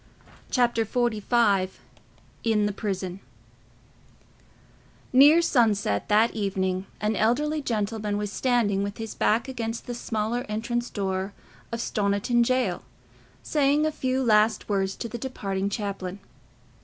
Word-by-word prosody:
Chapter 240 -2 +2
XLV 220 -4 +1 0.7
In 220 -2 +2
the 205 - 0
Prison 190 -3 -4 1.9
Near 295 +6 +7
sunset 210 - +1
that 215 +3 +4
evening 190 -2 -1
an 215 +1 0
elderly 295 +9 +1
gentleman 210 -4 -2
was 205 -1 -3
standing 230 -5 +1
with 200 0 -3
his 225 -1 -5
back 225 +4 +1
against 230 -3 -4
the 245 - -4
smaller 230 +1 -2
entrance 235 +3 -2
door 190 -1 -2 0.4
of 230 0 -3
Stoniton 205 +3 +1
jail, 255 +1 0 0.6
saying 295 0 +2
a 310 - +1
few 260 -3 -1
last 215 -1 +3
words 195 -2 0
to 235 - -5
the 235 +1 -6
departing 200 -6 -3
chaplain. 200 -2 -4
220 Hz, 120 wpm, -26 LUFS, 200-240 Hz, 1.9 s, Near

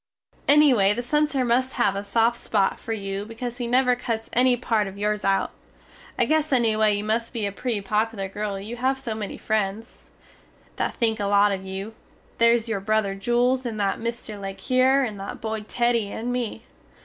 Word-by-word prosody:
Ennyway 255 -9 +5
the 245 - -3
censer 295 0 +1
must 255 +2 +1
have 200 -5 +1
a 200 - -3
soft 230 +3 +2
spot 200 -5 0
fer - - -7
you 195 -2 -3
because 235 +3 -6
he 240 - -2
never 250 +1 +3
cuts 230 -2 -4
enny 250 0 +4
part 225 -4 0
of 195 +1 -9
yours 210 0 -1
out. 195 0 +1 0.7
I - - +3
guess 310 0 +1
ennyway 220 -4 +3
you 205 - -3
must 225 +3 -1
be 225 -4 -2
a 200 - -2
pretty 220 +1 -2
poplar 210 0 -1
girl 200 0 -4
you 220 +5 -7
have 260 +2 +1
so 265 -4 -4
many 215 -2 -5
frens, 215 +1 -3 0.7
that - - -1
think 225 -2 +1
a 205 - -1
lot 205 0 +4
of 190 -1 -3
you, 190 +3 -6 0.5
theres 230 0 +4
your 225 -3 -1
brother 215 0 0
Jules 240 +5 +1
and 230 -4 -4
that 200 -1 0
Mr. 230 -3 -5
le 195 0 -5
Cure 255 +7 +3
and 215 -5 -4
that 195 - -6
guy 220 0 -3
Teddy 230 -1 0
and 240 +2 -3
me. 235 -2 -3
225 Hz, 195 wpm, -24 LUFS, 205-245 Hz, 0.7 s, Ennyway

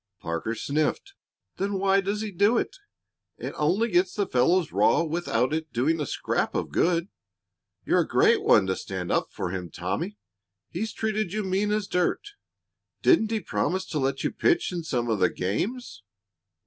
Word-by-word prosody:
Parker 85 +8 -3
sniffed. 155 - -1 0.4
"Then 200 +2 -1
why 195 +1 +3
does 200 +2 -2
he 215 -1 -4
do 205 +6 +3
it? - - -2 0.6
It - - -5
only 180 +10 +1
gets 180 -1 +2
the 205 - +1
fellows 165 +7 +2
raw - - +3
without 155 -6 0 0.2
doing 150 +7 +1
a 145 - -2
scrap - - -1
of - - -2
good. 170 +1 +1 0.8
You're - - +3
a - - +1
great 440 0 +4
one 100 - +5
to 95 0 0
stand 95 -2 -5
up - - 0
for 90 - -4
him, 90 -2 -5
Tommy! 95 +5 -4 0.5
He's 220 +6 -3
treated 215 -4 -2
you 215 0 -1
mean 195 +2 0
as 210 -1 0
dirt. 180 - 0 0.7
Didn't 275 -12 +4
he 220 -1 -1
promise 190 0 -1
to 155 - -1
let 135 0 -1
you - - 0
pitch 170 - +1
in 175 -2 -4
some 125 -6 -1
of 110 -3 0
the 90 - +4
games?" 185 - -3
175 Hz, 175 wpm, -26 LUFS, 125-205 Hz, 0.8 s, one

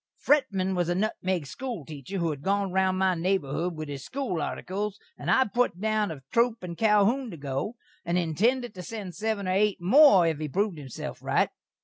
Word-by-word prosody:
Fretman 200 -10 +2
was 175 -2 0
a 175 - +1
nutmeg 185 -3 -1
skhool 225 - -6
teacher 150 +6 -7
who 170 -3 0
had 145 -2 -6
gone 195 +2 0
round 190 0 +2
my 190 0 +3
naborhood 175 -1 -1
with 155 -1 -5
his 140 -2 -6
skool 255 - -3
artikles, 195 +6 -3 0.2
and - - -5
I 265 - +5
put 240 -4 0
down 215 0 +1
of 145 -5 -8
Troup 235 -2 +2
and 170 -2 -5
Calhoun 220 +5 +3
to 170 - -8
go, 140 - -3 0.3
and 170 +1 0
intended 215 - +1
to 185 - -8
send 190 0 -6
seven 215 -1 -2
or - - +1
eight 200 +2 +2
more 195 - +7
if 160 -3 0
he 155 -1 -3
proved 195 +1 -1
himself 135 -4 -7
right. - - +2
190 Hz, 200 wpm, -27 LUFS, 170-215 Hz, 0.3 s, more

